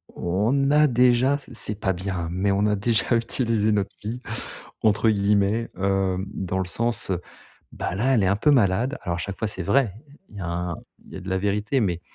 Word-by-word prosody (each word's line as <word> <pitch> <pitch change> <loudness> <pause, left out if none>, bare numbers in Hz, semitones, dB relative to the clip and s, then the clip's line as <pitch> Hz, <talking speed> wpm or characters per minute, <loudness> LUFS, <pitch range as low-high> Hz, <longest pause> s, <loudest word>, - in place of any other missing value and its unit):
on 110 +11 +1
a 150 0 +5
déjà, 125 +2 +3
c - - -16
c'est 105 -2 -2
pas 95 -3 +1
bien, 90 -2 -3
mais 95 +3 0
on 100 +1 +2
a 105 - +2
déjà 110 +2 +1
utilisé 115 -2 +1
«notre 100 -2 -1
fille» 115 +4 -5 0.6
entre 110 +1 +3
guillemets, 105 +2 +1
hem, 95 -1 0
dans 95 0 -2
le 95 - -1
sens, 115 +6 -1
heu. 90 -3 0 0.5
Bah - - -4
là, 130 +7 +2
elle 115 - +3
est - - +2
un 100 - +3
peu 150 +8 +3
malade. 120 +2 +2
Alors 85 -2 -2
à - - -4
chaque 100 +3 -5
fois, 110 - 0
c'est 95 -3 -3
vrai, 125 -1 +2
heu, - - -20 0.2
il 105 - -13
y - - -6
a 90 - -4
un 85 0 -3 0.3
il - - -14
y - - -6
a - - -7
de 95 - -7
la 95 - +1
vérité, 105 +6 0
mais 90 -4 -1
105 Hz, 225 wpm, -24 LUFS, 95-115 Hz, 0.6 s, a